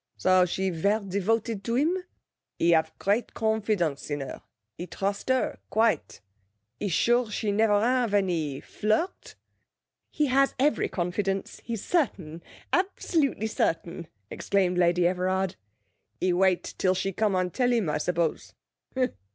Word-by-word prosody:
'So 185 -1 +4
she 190 +2 -1
ver' 200 +6 +1
devoted 200 +2 -1
to 230 +3 -1
him? 310 +8 +2 0.6
He 170 - +3
have 160 -1 +3
great 210 +4 0
confidence 210 -10 0
in 145 -1 -2
her; 135 - -7 0.3
he 175 - -7
trust 200 +5 -3
her 260 0 +1
quite; 220 - +1 0.6
he 205 - -2
sure 240 +6 +2
she 210 0 -1
never 205 0 +3
have 245 0 +1
any 165 -8 0
flirt?' 220 - -2 0.7
'He 300 - 0
has 275 0 +2
every 290 +3 +2
confidence; 195 +2 -2
he's 230 -3 -5
certain, 175 - -1 0.3
absolutely 330 - 0
certain!' 170 -5 -2 0.2
exclaimed 185 -3 0
Lady 175 0 +3
Everard. 185 +1 0 0.6
'He 185 -1 +1
wait 185 0 +2 0.2
till 185 -1 +2
she 195 +1 -2
come 210 0 +1
and 185 -1 0
tell 250 -1 +2
him, 230 -7 +1
I 150 0 0
suppose. 170 0 -1
195 Hz, 135 wpm, -27 LUFS, 180-225 Hz, 0.7 s, So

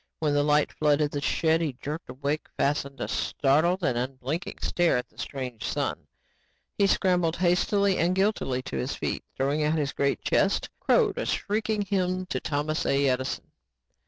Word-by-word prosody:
When 150 -2 0
the 145 - +3
light 150 0 +3
flooded 150 -1 +2
the 145 - -3
shed 160 +2 +2
he 155 -5 -1
jerked 150 +5 -6
awake 140 +4 -3
and - - -39
fastened 140 -1 0
a - - -1
startled 160 +7 +1
and 125 - +1
unblinking 135 +7 -4
stare 175 -6 +2
at 125 - -3
the - - -29
strange 125 -7 -5
sun. - - -2 0.7
He 200 - +3
scrambled 180 -4 +2
hastily 190 +2 +2
and 175 +2 +2
guiltily 190 -10 0
to 70 - -5
his 65 - -2
feet - - -3
and - - -42
throwing 140 +3 +1
out 150 +1 +2
his 145 -2 -1
great 140 0 0
chest, - - +1
crowed - - +2
a - - -2
shrieking 215 0 0
hymn 185 -2 -1
to - - 0
Thomas 150 +1 -1
A. 140 0 +3
Edison. 130 0 -2
150 Hz, 180 wpm, -27 LUFS, 140-180 Hz, 0.7 s, the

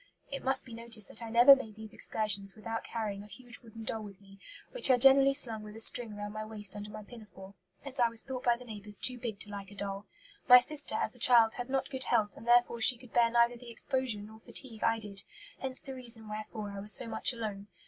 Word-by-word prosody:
It 275 - -5
must 265 0 +1
be 240 - -12
noticed 230 -2 -2
that 225 - -5
I 230 - -7
never 240 +4 +8
made 225 -6 -8
these 220 -1 -8
excursions 200 -3 0
without 225 +1 -5
carrying 210 -4 -5
a 205 - -12
huge 245 +4 -9
wooden 225 -2 -12
doll 220 0 -3
with 200 -2 -11
me, 195 0 -18 0.3
which - - +3
I 255 - +5
generally 270 +2 +5
slung 230 -6 +4
with 210 0 -11
a - - -9
string 225 -1 0
round 205 0 -7
my 215 0 -5
waist 210 -2 -4
under 205 0 -7
my 210 0 -9
pinafore, 205 -4 -13 0.3
as 275 -1 -5
I 240 -1 +4
was 230 -1 0
thought 255 -1 -6
by 240 -1 +2
the 250 - -13
neighbours 210 -2 -9
too 250 +3 0
big 225 -4 -5
to 205 - -3
like 200 -1 -8
a 205 - -14
doll. 200 0 -6 0.4
My 250 - +11
sister, 290 -2 -2
as 220 - +1
a - - -17
child, 230 -2 +5
had 245 +1 -6
not 270 +1 -2
good 260 -1 0
health, 210 -2 +1
and 230 - -13
therefore 240 -1 +3
she 245 +2 +7
could 245 0 -17
bear 235 -1 +4
neither 235 +1 +2
the 240 0 -13
exposure 250 -2 -2
nor 220 +1 -12
fatigue 225 -1 -4
I 225 0 +2
did; 205 -3 -2 0.4
hence 265 -1 -4
the 270 - -6
reason 235 -4 -2
wherefore 215 0 -7
I 200 - -7
was 205 +2 +4
so - - +4
much 220 +2 +2
alone. 210 -4 -6
225 Hz, 250 wpm, -31 LUFS, 210-245 Hz, 0.4 s, My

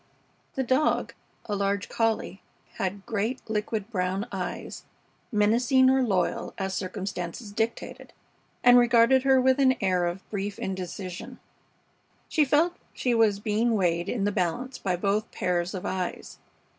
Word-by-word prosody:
The 265 - 0
dog, 260 +4 +1 0.3
a 205 - -2
large 200 0 -1
collie, 225 -4 -1 0.4
had 195 +1 -3
great, 225 +4 -1
liquid, 215 0 -2
brown 190 0 -1
eyes, - - -5 0.5
menacing 240 +5 +4
or 265 0 +3
loyal, 190 -8 0
as 190 -1 -2
circumstances 190 +2 -5
dictated, 225 +3 -3 0.5
and 245 0 +8
regarded 240 +2 +5
her 265 0 +4
with 260 +1 +3
an 260 -1 +5
air 185 -3 +1
of 175 +3 -5
brief 200 -1 -3
indecision. 185 -1 -6 0.9
She 310 - +3
felt 320 +6 +2 0.2
she 250 - 0
was 220 -3 +3
being 220 +2 +1
weighed 175 -3 +1
in 225 -5 -1
the 205 - +1
balance 210 +8 -2
by 185 -2 0
both 200 +4 0
pairs 180 0 -1
of 185 - -5
eyes. 185 -2 -4
205 Hz, 140 wpm, -27 LUFS, 190-245 Hz, 0.9 s, and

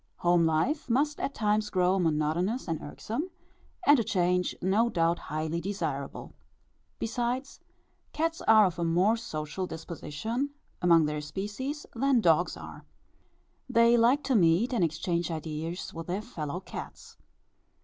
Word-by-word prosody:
Home 175 -1 +3
life 250 - 0
must 290 +5 +1
at 275 - -3
times 210 -1 +1
grow 185 0 +2
monotonous 170 - 0
and 165 -2 -2
irksome, 235 - -4 0.6
and 290 -2 +7
a - - +2
change 180 -4 +1
no 205 +6 +2
doubt 170 -3 +1
highly 155 +2 -3
desirable. 200 +3 -4 0.6
Besides, 245 +4 -2 0.5
cats 330 +1 -1
are 220 -1 +7
of 175 -2 -2
a - - 0
more 180 +7 +3
social 170 -4 -4
disposition 200 - -4 0.3
among 170 -3 +5
their 150 0 -2
species 210 - -5
than 265 +1 +3
dogs 175 -3 +3
are. - - -10 0.9
They 235 -1 +5
like 245 +5 +4
to 270 - 0
meet 185 +6 +3
and 230 - +2
exchange 170 +2 -1
ideas 160 +2 -4
with 165 0 -7
their 190 +4 -2
fellow 170 - -5
cats. - - -9
185 Hz, 140 wpm, -29 LUFS, 165-235 Hz, 0.9 s, and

